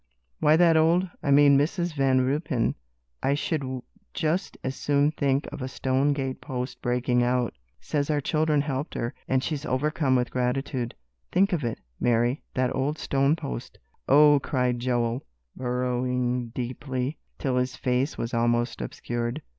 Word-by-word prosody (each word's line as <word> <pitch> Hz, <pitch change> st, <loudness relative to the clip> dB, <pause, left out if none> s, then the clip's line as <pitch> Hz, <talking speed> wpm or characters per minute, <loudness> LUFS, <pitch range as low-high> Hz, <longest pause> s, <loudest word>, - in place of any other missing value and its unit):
"Why, 150 Hz, +1 st, +5 dB
that 170 Hz, 0 st, +5 dB
old 170 Hz, +4 st, +4 dB
I -, -, -2 dB
mean 140 Hz, 0 st, +6 dB
Mrs. 170 Hz, +3 st, 0 dB
Van 135 Hz, -3 st, +3 dB
Ruypen, 135 Hz, -1 st, 0 dB, 0.5 s
I 140 Hz, -, +2 dB
should 135 Hz, -5 st, -2 dB, 0.3 s
just 175 Hz, +2 st, -1 dB
as 130 Hz, +1 st, -2 dB
soon 145 Hz, +1 st, +2 dB
think 140 Hz, -2 st, 0 dB
of -, -, -7 dB
a 130 Hz, -, -2 dB
stone 130 Hz, +2 st, +1 dB
gate 135 Hz, -2 st, -3 dB
post 125 Hz, -1 st, -5 dB
breaking 125 Hz, 0 st, +1 dB
out 125 Hz, 0 st, +1 dB, 0.3 s
says 145 Hz, -1 st, -2 dB
our 150 Hz, -1 st, +2 dB
children 155 Hz, 0 st, +1 dB
helped 140 Hz, +1 st, -3 dB
her, 115 Hz, +1 st, -2 dB
and 130 Hz, 0 st, +1 dB
she's 150 Hz, -3 st, -2 dB
overcome 145 Hz, 0 st, +1 dB
with 125 Hz, -1 st, +1 dB
gratitude. 125 Hz, 0 st, -1 dB, 0.4 s
Think 195 Hz, +1 st, +3 dB
of 160 Hz, -5 st, 0 dB
it, 115 Hz, -1 st, -2 dB, 0.2 s
Mary, 120 Hz, +3 st, +2 dB
that 130 Hz, 0 st, +1 dB
old 140 Hz, +4 st, 0 dB
stone 140 Hz, +2 st, +2 dB
post!" 60 Hz, -, -6 dB, 0.3 s
"Oh!" 145 Hz, +1 st, +7 dB
cried 125 Hz, -3 st, 0 dB
Joel, 120 Hz, 0 st, 0 dB, 0.3 s
burrowing 125 Hz, 0 st, -1 dB
deeply, 125 Hz, +3 st, -4 dB, 0.2 s
till 130 Hz, -3 st, -1 dB
his 125 Hz, 0 st, 0 dB
face 130 Hz, +3 st, 0 dB
was 115 Hz, +1 st, -3 dB
almost 120 Hz, 0 st, +1 dB
obscured. 120 Hz, +4 st, -4 dB
130 Hz, 155 wpm, -26 LUFS, 125-145 Hz, 0.5 s, Oh